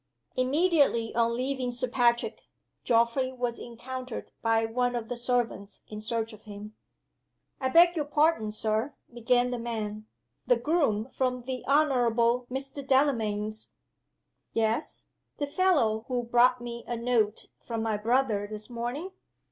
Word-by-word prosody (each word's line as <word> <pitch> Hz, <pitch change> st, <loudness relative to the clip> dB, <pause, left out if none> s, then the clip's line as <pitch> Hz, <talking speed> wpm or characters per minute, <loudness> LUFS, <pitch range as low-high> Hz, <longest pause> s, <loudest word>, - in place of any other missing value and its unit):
Immediately 275 Hz, -3 st, +2 dB
on 235 Hz, 0 st, +2 dB
leaving 260 Hz, 0 st, -1 dB
Sir 245 Hz, +1 st, -1 dB
Patrick, 240 Hz, -1 st, +1 dB, 0.4 s
Geoffrey 235 Hz, +2 st, +2 dB
was 245 Hz, -2 st, -3 dB
encountered 255 Hz, +1 st, -7 dB
by 225 Hz, 0 st, +2 dB
one 245 Hz, +2 st, 0 dB
of 225 Hz, -2 st, -4 dB
the 245 Hz, -, -2 dB
servants 240 Hz, -4 st, -2 dB
in 210 Hz, 0 st, -7 dB
search 225 Hz, +1 st, -2 dB
of 215 Hz, -, -15 dB
him. 210 Hz, 0 st, -9 dB, 0.9 s
"I 260 Hz, -, 0 dB
beg 345 Hz, +4 st, +6 dB
your 300 Hz, -3 st, -1 dB
pardon, 295 Hz, -6 st, +2 dB
Sir," 220 Hz, +6 st, 0 dB, 0.2 s
began 245 Hz, +1 st, +2 dB
the 245 Hz, -, -2 dB
man. 215 Hz, -2 st, -4 dB, 0.4 s
"The -, -, +5 dB
groom 275 Hz, -, 0 dB
from 250 Hz, -2 st, -1 dB
the 255 Hz, 0 st, -5 dB
Honorable 245 Hz, -4 st, +3 dB
Mr. 270 Hz, +2 st, -5 dB
Delamayn's 220 Hz, -6 st, +1 dB, 0.4 s
" -, -, -52 dB
"Yes? 225 Hz, +7 st, -2 dB, 0.3 s
The 290 Hz, -, -1 dB
fellow 280 Hz, -10 st, +2 dB
who 250 Hz, -2 st, -1 dB
brought 245 Hz, +1 st, +4 dB
me 235 Hz, 0 st, -6 dB
a 240 Hz, -, -2 dB
note 230 Hz, -3 st, +1 dB, 0.2 s
from 230 Hz, -2 st, -4 dB
my 220 Hz, -1 st, 0 dB
brother 220 Hz, -1 st, +1 dB
this 215 Hz, +2 st, -7 dB
morning?" 245 Hz, +10 st, -4 dB
240 Hz, 140 wpm, -28 LUFS, 225-260 Hz, 0.9 s, beg